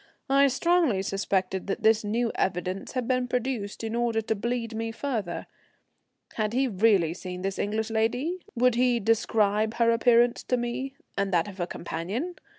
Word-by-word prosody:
I 275 +1 +6
strongly 280 - +2
suspected 190 -1 -1
that 195 - -3
this 220 0 +4
new 230 +3 0
evidence 185 +1 -2
had 250 -3 -2
been 255 -1 +1
produced 245 -4 -3
in 225 0 -3
order 235 -1 +1
to 220 0 -1
bleed 230 +2 -3
me 225 0 -3
further. 225 -7 -3 0.9
Had 215 0 0
he 265 +2 +2
really 195 -6 +3
seen 180 0 -7
this 195 0 -2
English 215 +2 -1
lady? 245 +11 0 0.2
Would 250 +1 +4
he 245 0 +2
describe 215 0 +1
her 235 -1 +3
appearance 235 +1 +4
to 250 - +1
me, 245 +3 -3 0.2
and 200 0 -1
that 170 -1 +2
of 200 -2 -10
her 175 - -1
companion? 200 - -4
225 Hz, 165 wpm, -27 LUFS, 200-245 Hz, 0.9 s, I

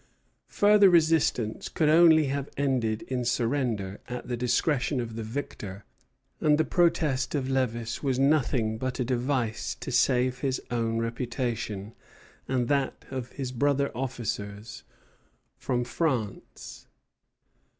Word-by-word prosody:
Further 205 -1 +5
resistance 160 -10 +2
could 155 - +1
only 160 0 +6
have 140 0 -3
ended 125 -6 0
in 125 -1 -3
surrender 115 -5 -1
at 125 0 -6
the 125 - -2
discretion 125 +3 +1
of 115 -2 -4
the 115 - -4
victor, 110 -4 -6 0.5
and 150 -1 +3
the 160 - +2
protest 165 -7 +1
of 140 -3 -1
Lévis 120 -3 -1
was 135 -3 0
nothing 125 -6 +2
but 130 +1 -3
a 125 - 0
device 125 -2 -1
to - - -7
save 125 0 +2
his 135 -1 -1
own 115 -1 0
reputation 115 -3 -3 0.5
and 125 -2 0
that 140 -2 -1
of 130 -2 -5
his 130 -3 -4
brother 140 +2 +1
officers 110 -4 -4 0.8
from 125 -1 -1
France. 125 - -3
125 Hz, 125 wpm, -27 LUFS, 115-140 Hz, 0.8 s, only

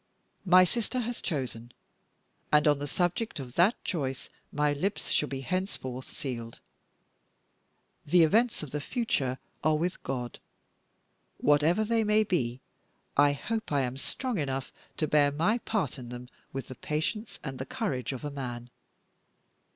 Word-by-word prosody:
My 185 +1 +8
sister 235 +6 0
has 240 +1 -4
chosen; 125 - -3 0.8
and 150 0 +5
on 145 -1 +4
the 145 - -3
subject 175 +5 0
of 125 -3 -7
that 180 - +5
choice 135 -7 -2 0.2
my 150 0 +2
lips 190 +8 -1
shall 150 - +2
be 135 -1 -3
henceforth 135 -6 -3
sealed. 120 -6 -5 1.5
The 170 +3 +6
events 220 +5 +3
of 145 - -7
the 150 - -2
future 145 - 0 0.3
are 155 0 +4
with 175 +3 -1
God; 125 -3 -4 1.0
whatever 150 +8 +4
they 225 +1 +2
may 215 0 +4
be, 130 - -1 0.5
I 145 0 +6
hope 220 +9 -3
I 140 -1 +3
am 125 -1 -1
strong 240 - -2
enough 135 -2 -2 0.3
to 155 - +1
bear 145 -1 +4
my 175 +11 +2
part 195 - -1
in 120 -2 -8
them 125 0 -8 0.2
with 135 0 -4
the 130 - -8
patience 160 - -2
and 135 -3 -5
the - - -3
courage 220 - -2
of 130 +2 -5
a 145 - -3
man! 120 -3 -5
150 Hz, 150 wpm, -29 LUFS, 130-195 Hz, 1.5 s, My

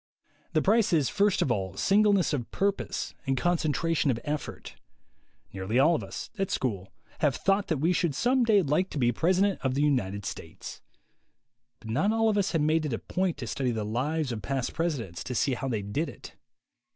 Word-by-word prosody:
The 155 - +2
price 215 -1 +3
is 150 -5 +3
first 205 -1 +2
of 130 - 0
all 95 -4 -2
singleness 200 - +3
of 125 -5 -2
purpose 200 0 -2
and 135 0 +1
concentration 165 -1 +1
of 120 -3 +1
effort. 150 0 -5 0.8
Nearly 95 +5 -2
all 150 +6 +5
of 160 - -1
us, - - -7
at 195 - 0
school, 100 -7 -2 0.3
have 145 -3 +2
thought 195 +1 +1
that 160 - 0
we 165 +6 +2
should 170 -5 0
some 250 - +2
day 215 -4 +4
like 155 +6 +1
to - - -6
be 120 -3 +3
President 185 - +2
of 130 -1 0
the 145 - +2
United 105 -9 0
States. 80 - -8 1.0
But 110 -1 -7
not 155 - +2
all 225 0 +2
of 210 - +1
us 195 - 0
have 165 - +2
made 155 +1 +2
it 135 - -3
a - - 0
point 185 +5 -2
to 130 - -5
study 130 +2 -1
the 110 -3 -2
lives 135 +6 -1
of 110 -2 -4
past 130 +5 -2
presidents 140 - -3
to 125 - -5
see 135 +3 +1
how 135 +2 -3
they 110 -5 -2
did 140 +12 -2
it. - - -12
150 Hz, 200 wpm, -28 LUFS, 120-185 Hz, 1.0 s, all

